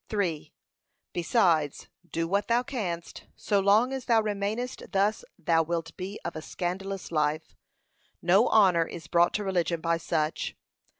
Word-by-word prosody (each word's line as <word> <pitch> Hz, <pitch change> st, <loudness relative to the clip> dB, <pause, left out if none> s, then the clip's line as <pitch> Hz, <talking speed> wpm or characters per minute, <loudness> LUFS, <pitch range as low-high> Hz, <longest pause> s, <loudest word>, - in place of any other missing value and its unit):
3. 180 Hz, -8 st, -2 dB, 0.6 s
Besides, 170 Hz, -, +1 dB, 0.2 s
do 165 Hz, 0 st, -1 dB
what 200 Hz, +4 st, 0 dB
thou 235 Hz, +1 st, +2 dB
canst, 185 Hz, -11 st, -5 dB
so 205 Hz, -, +1 dB
long 210 Hz, +6 st, +4 dB
as 265 Hz, -2 st, -4 dB
thou 230 Hz, -2 st, +4 dB
remainest 215 Hz, +3 st, -2 dB
thus 205 Hz, +1 st, +1 dB
thou 165 Hz, -2 st, +2 dB
wilt 165 Hz, 0 st, -3 dB
be 190 Hz, +3 st, -6 dB
of -, -, -4 dB
a 155 Hz, -, -5 dB
scandalous 185 Hz, +3 st, -4 dB
life. 155 Hz, 0 st, -1 dB, 0.6 s
No 190 Hz, +6 st, +4 dB
honour 185 Hz, -6 st, +5 dB
is 170 Hz, -, -8 dB
brought 175 Hz, 0 st, +3 dB
to 210 Hz, -, -1 dB
religion 175 Hz, -3 st, 0 dB
by 165 Hz, 0 st, +1 dB
such. 160 Hz, -1 st, -2 dB
185 Hz, 145 wpm, -28 LUFS, 165-205 Hz, 0.6 s, honour